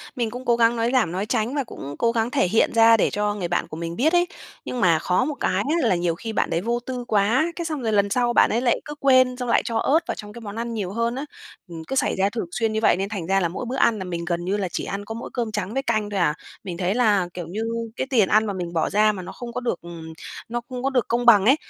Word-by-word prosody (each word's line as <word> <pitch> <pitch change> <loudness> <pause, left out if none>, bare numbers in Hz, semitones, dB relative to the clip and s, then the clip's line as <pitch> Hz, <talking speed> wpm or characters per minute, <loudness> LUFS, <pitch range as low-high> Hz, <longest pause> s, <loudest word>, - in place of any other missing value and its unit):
Mình 235 -3 -1
cũng 250 +2 -7
cố 240 - +3
gắng 235 0 +3
nói 230 +1 0
giảm, 235 -10 +2
nói 190 +3 -2
tránh 225 +3 -1
và 285 - 0
cũng 145 - -8
cố 230 0 +3
gắng 230 +1 0
thể 270 -10 +2
hiện 220 - +2
ra 230 0 +6
để - - +2
cho 210 0 -1
người 180 -4 -3
bạn 175 - -1
của 155 - -8
mình 170 0 -4
biết 305 - +2
ấy, 350 0 +4 0.4
nhưng 250 - -4
mà 165 -3 +4
khó 180 +9 +1
một 295 0 -3
cái - - +1 0.2
á 240 - +2
là 185 - +3
nhiều 175 -1 0
khi 225 +6 -6
bạn - - 0
đấy 170 - 0
vô 235 +3 -1
tư 250 -1 -4
quá, 220 +6 +3
cái 340 - -4
xong 310 -4 -3
rồi 225 -2 -1
lần 200 -1 +3
sau 240 +2 +1
bạn - - +5
ấy 235 +3 0
lại 240 -2 +2
cứ 295 - -7
quên 255 -2 +4
xong 250 -2 -4
lại - - +4
cho 230 - -1
ớt 290 +7 +3
vào - - -2
trong 210 0 -9
cái 235 - -10
món 205 -2 -7
ăn 230 0 -3
nhiều 200 -5 -3
hơn 230 +3 -1
á. 275 +3 -4 0.4
Ừm, 165 -2 -8
cứ 270 - -3
xảy - - +1
ra 195 +1 +2
thường 225 -1 -3
xuyên 225 +1 -1
như 220 - 0
vậy - - +4
nên 195 +1 -2
thành 195 -6 -5
ra 195 +1 +3
là 175 - +1
mỗi 190 - -5
bữa 245 +2 -4
ăn 235 -4 +3
là 190 - -4
mình 170 -2 -4
gần 170 0 -2
như 195 +3 0
là 195 -2 -1
chỉ - - -3
ăn 200 +1 -5
có 225 - -6
mỗi 230 - -6
cơm 235 -3 -2
trắng 210 0 -3
với 270 - 0
canh 215 -4 0
thôi 200 -1 -2
à, 150 -4 +3 0.3
mình 175 -3 -6
thấy 185 +3 0
là, 210 -7 +3
kiểu 175 -2 -6
như, 205 +6 -4 0.3
cái 260 - -3
tiền 225 -8 +3
ăn 215 +1 +4
mà 205 - -2
mình 175 -2 -5
bỏ 160 -2 +1
ra 215 +1 +4
mà 195 - -6
nó 180 - -8
không 240 -1 -8
có 250 - -3
được, 235 -8 -2
ừm, 165 -1 -9 0.4
nó 240 0 -2
không 250 -1 -5
có 270 - +2
được 255 -3 0
công 240 +1 0
bằng 210 -5 +7
ấy, 265 +5 +6
220 Hz, 315 wpm, -23 LUFS, 190-240 Hz, 0.4 s, bằng